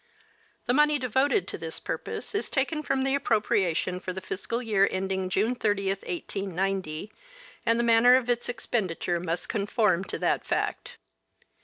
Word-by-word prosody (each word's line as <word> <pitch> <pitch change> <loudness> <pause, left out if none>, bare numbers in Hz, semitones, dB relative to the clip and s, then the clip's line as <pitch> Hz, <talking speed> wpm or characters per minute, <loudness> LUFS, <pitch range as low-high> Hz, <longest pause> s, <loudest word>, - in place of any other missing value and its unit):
The 245 - +2
money 300 +2 +4
devoted 265 - +1
to - - -5
this - - -6
purpose - - -5
is 415 - -1
taken 295 +3 0
from 270 -3 0
the 270 0 +1
appropriation 205 - +1
for 185 0 -5
the 190 - -4
fiscal 190 +4 -3
year 210 -5 +3
ending 190 0 -2
June 210 +6 +1
30, 205 -5 0
1890, 195 -1 -3 0.5
and 230 0 +4
the - - +2
manner 235 +2 +6
of 255 -2 +1
its 240 0 0
expenditure 190 -7 -1
must 170 0 -2
conform 205 -3 +1
to - - -4
that - - 0
fact. - - -2
210 Hz, 155 wpm, -27 LUFS, 190-245 Hz, 0.5 s, manner